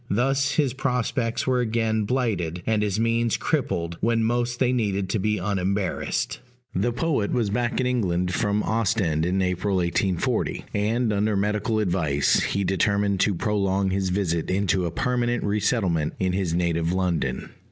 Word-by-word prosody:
Thus 135 Hz, +5 st, +1 dB
his 140 Hz, -5 st, +1 dB
prospects 125 Hz, -3 st, -1 dB
were 130 Hz, -1 st, +2 dB
again 110 Hz, -2 st, 0 dB
blighted, 100 Hz, -9 st, -1 dB
and 110 Hz, -1 st, +1 dB
his 105 Hz, -1 st, 0 dB
means 115 Hz, 0 st, +1 dB
crippled 85 Hz, -, -1 dB
when 115 Hz, 0 st, +2 dB
most 120 Hz, +1 st, 0 dB
they 125 Hz, 0 st, +2 dB
needed 100 Hz, -5 st, -1 dB
to 110 Hz, -, 0 dB
be 105 Hz, +2 st, 0 dB
unembarrassed. 95 Hz, 0 st, -1 dB, 0.3 s
The 105 Hz, +6 st, +1 dB
poet 120 Hz, -5 st, 0 dB
was 115 Hz, -5 st, 0 dB
back 120 Hz, +2 st, 0 dB
in 130 Hz, -, +1 dB
England 90 Hz, -8 st, 0 dB
from 105 Hz, -2 st, 0 dB
Ostend 95 Hz, -8 st, +1 dB
in 95 Hz, +1 st, +1 dB
April 90 Hz, +2 st, 0 dB
1840; 90 Hz, +1 st, 0 dB
and, 110 Hz, +2 st, +1 dB
under 105 Hz, +1 st, +1 dB
medical 105 Hz, +3 st, 0 dB
advice, 85 Hz, -8 st, +2 dB
he 100 Hz, -, 0 dB
determined 100 Hz, +1 st, +1 dB
to 100 Hz, 0 st, +2 dB
prolong 100 Hz, 0 st, 0 dB
his 95 Hz, 0 st, 0 dB
visit 90 Hz, -4 st, -1 dB
into 95 Hz, -1 st, +1 dB
a -, -, -4 dB
permanent 120 Hz, +3 st, 0 dB
re 105 Hz, +1 st, 0 dB
settlement 95 Hz, -8 st, 0 dB
in 95 Hz, -1 st, 0 dB
his 90 Hz, -3 st, -1 dB
native 85 Hz, -1 st, 0 dB
London. 90 Hz, -3 st, -1 dB
105 Hz, 160 wpm, -24 LUFS, 90-115 Hz, 0.3 s, were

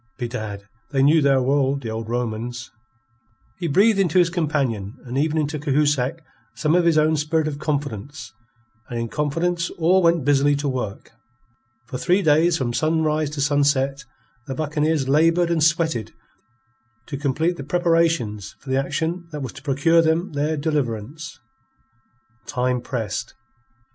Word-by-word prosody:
Bedad, 110 Hz, -5 st, -5 dB, 0.2 s
they 135 Hz, -2 st, +1 dB
knew 155 Hz, +3 st, +5 dB
their 135 Hz, -2 st, +3 dB
world, 140 Hz, 0 st, +1 dB
the 115 Hz, -, -4 dB
old 110 Hz, 0 st, -5 dB
Romans." 120 Hz, 0 st, -3 dB, 0.9 s
He 175 Hz, -, -2 dB
breathed 200 Hz, +7 st, +4 dB
into 185 Hz, -3 st, +2 dB
his 175 Hz, -1 st, +4 dB
companions 140 Hz, -, -1 dB
and 125 Hz, +1 st, -6 dB
even 155 Hz, +3 st, +1 dB
into 150 Hz, 0 st, -1 dB
Cahusac 145 Hz, 0 st, 0 dB, 0.3 s
some 155 Hz, 0 st, +1 dB
of 175 Hz, 0 st, +3 dB
his 165 Hz, -2 st, +4 dB
own 155 Hz, +1 st, +3 dB
spirit 155 Hz, +1 st, 0 dB
of 145 Hz, -2 st, -4 dB
confidence, 145 Hz, -2 st, -4 dB, 0.6 s
and 120 Hz, -, -3 dB
in 115 Hz, 0 st, -3 dB
confidence 165 Hz, +5 st, -1 dB
all 175 Hz, +3 st, +4 dB
went 170 Hz, -4 st, +2 dB
busily 145 Hz, 0 st, +3 dB
to 145 Hz, +1 st, -2 dB
work. 125 Hz, -6 st, -4 dB, 0.7 s
For 125 Hz, +1 st, -6 dB
three 185 Hz, +7 st, +2 dB
days 160 Hz, +2 st, +4 dB
from 120 Hz, -4 st, -2 dB
sunrise 155 Hz, 0 st, +1 dB
to 150 Hz, -1 st, -4 dB
sunset, 140 Hz, -1 st, +1 dB, 0.4 s
the 135 Hz, -, -4 dB
buccaneers 150 Hz, -1 st, 0 dB
laboured 165 Hz, +4 st, +3 dB
and 160 Hz, -2 st, +2 dB
sweated 160 Hz, -7 st, +1 dB, 0.9 s
to 140 Hz, -, -6 dB
complete 150 Hz, +5 st, 0 dB
the 140 Hz, -, -6 dB
preparations 165 Hz, -, 0 dB
for 130 Hz, -, -8 dB
the 135 Hz, +1 st, +2 dB
action 170 Hz, +4 st, -3 dB
that 150 Hz, -2 st, -5 dB
was 130 Hz, -, -6 dB
to 145 Hz, -, -11 dB
procure 145 Hz, +4 st, +3 dB
them 165 Hz, +3 st, 0 dB
their 150 Hz, +2 st, -1 dB
deliverance. 145 Hz, 0 st, -3 dB, 1.1 s
Time 125 Hz, 0 st, 0 dB
pressed. 115 Hz, -8 st, -4 dB
145 Hz, 150 wpm, -22 LUFS, 130-160 Hz, 1.1 s, knew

